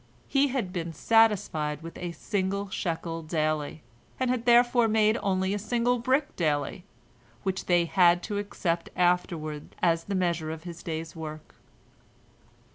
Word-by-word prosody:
He 280 0 +3
had 245 -9 -2
been 170 -2 -3
satisfied 160 -5 +2
with 165 - -8
a 175 -1 -4
single 200 +2 -2
shekel 165 -2 -3
daily, 155 -1 -2 0.4
and 255 -1 +1
had 250 -1 -2
therefore 240 0 +5
made 215 0 +3
only 190 0 0
a 205 - -1
single 240 +3 +1
brick 265 +4 +1
daily, 155 +2 -1 0.6
which 190 -1 -2
they 175 -1 +4
had 175 0 +4
to 205 -2 -2
accept 175 -4 -2
afterward 170 -4 0
as 165 -1 +2
the 200 - -2
measure 170 -4 0
of 160 0 -6
his 170 -1 -8
day's 160 -1 -5
work. 155 -1 -8
180 Hz, 145 wpm, -27 LUFS, 165-215 Hz, 0.6 s, therefore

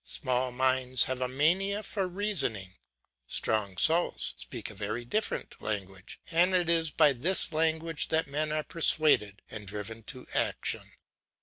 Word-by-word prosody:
Small 130 -3 -2
minds 130 0 +2
have 130 0 -3
a 125 - +1
mania 185 +10 +1
for 195 -2 -2
reasoning. 175 - 0 0.5
Strong 100 -4 -1
souls 165 - +2
speak - - -7
a - - -12
very 110 +4 -4
different 215 - -3
language, 95 -3 -5
and 175 +3 +3
it 175 -2 +2
is 165 -2 +3
by 150 -1 +4
this 165 +7 +1
language 160 0 0
that 160 0 +1
men 150 +2 -2
are 155 0 -1
persuaded 150 - +2
and 105 -2 -7
driven 105 +3 -5
to 130 +1 -7
action. - - -1
140 Hz, 145 wpm, -29 LUFS, 110-165 Hz, 0.5 s, by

